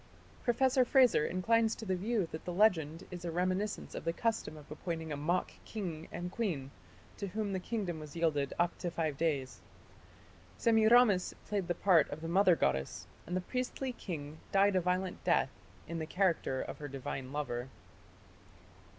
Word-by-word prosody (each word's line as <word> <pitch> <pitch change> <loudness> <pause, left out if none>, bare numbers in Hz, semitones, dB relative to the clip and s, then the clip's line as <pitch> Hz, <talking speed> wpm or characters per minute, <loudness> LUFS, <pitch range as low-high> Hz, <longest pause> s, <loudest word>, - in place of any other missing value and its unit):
Professor 255 +2 +3
Frazer 250 - +5
inclines 225 +5 +2
to 225 - -8
the 190 -2 0
view 205 0 0
that 160 - -6
the 180 - -4
legend 170 -5 +2
is 180 -1 -7
a 175 - -2
reminiscence 185 +4 -1
of - - -5
the 165 - +1
custom 225 -4 -1
of 150 -1 -14
appointing 160 0 -4
a - - -1
mock 155 +6 0
king 170 -7 -5
and 175 +1 -4
queen 165 - -2 0.5
to 200 - -3
whom 205 +1 -2
the 190 - 0
kingdom 185 -5 -3
was 150 -1 -9
yielded 150 -5 +1
up 175 0 +2
for 175 - -1
five 160 -3 -1
days. 140 -4 -1 1.0
Semiramis 225 -3 +5
played 200 -4 -1
the 175 - 0
part 180 -5 +4
of 150 +2 -6
the 165 - -4
mother 185 +1 +5
goddess, 70 - -1 0.2
and 180 +2 -1
the - - -1
priestly 255 +5 -3
king 155 -8 -6
died 200 0 +4
a 185 - +4
violent 180 +1 -1
death - - +2 0.4
in 165 0 -4
the 160 - -4
character 170 -8 +1
of - - -7
her 145 - -5
divine 135 -1 -5
lover. 130 -4 -3
180 Hz, 175 wpm, -33 LUFS, 155-205 Hz, 1.0 s, Frazer